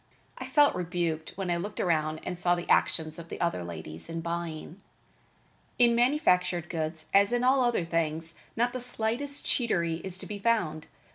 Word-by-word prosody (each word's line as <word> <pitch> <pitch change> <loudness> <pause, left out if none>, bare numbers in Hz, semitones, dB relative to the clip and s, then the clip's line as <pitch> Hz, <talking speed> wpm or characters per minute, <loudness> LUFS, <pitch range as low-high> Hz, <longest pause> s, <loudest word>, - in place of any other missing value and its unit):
I - - -5
felt 295 -2 +5
rebuked 175 -2 -2
when 190 -3 -2
I 170 - +1
looked 205 +5 -5
around 155 -2 0
and 180 - -5
saw 175 0 +3
the 175 - -5
actions 160 0 +2
of 165 0 -10
the - - -6
other 170 - 0
ladies 80 - -8
in 165 0 -3
buying. 170 +1 -5 1.0
In 240 -1 +5
manufactured 180 - +2
goods, 160 -1 -3
as 200 +2 +5
in 245 0 +1
all 260 +1 +4
other 240 -8 +1
things, 165 0 -1 0.2
not 240 +2 +1
the 255 - -3
slightest 250 +4 -2
cheatery 170 -9 +1
is 190 -1 -1
to - - -6
be 205 -1 -6
found. 180 -8 0
175 Hz, 180 wpm, -29 LUFS, 160-230 Hz, 1.0 s, felt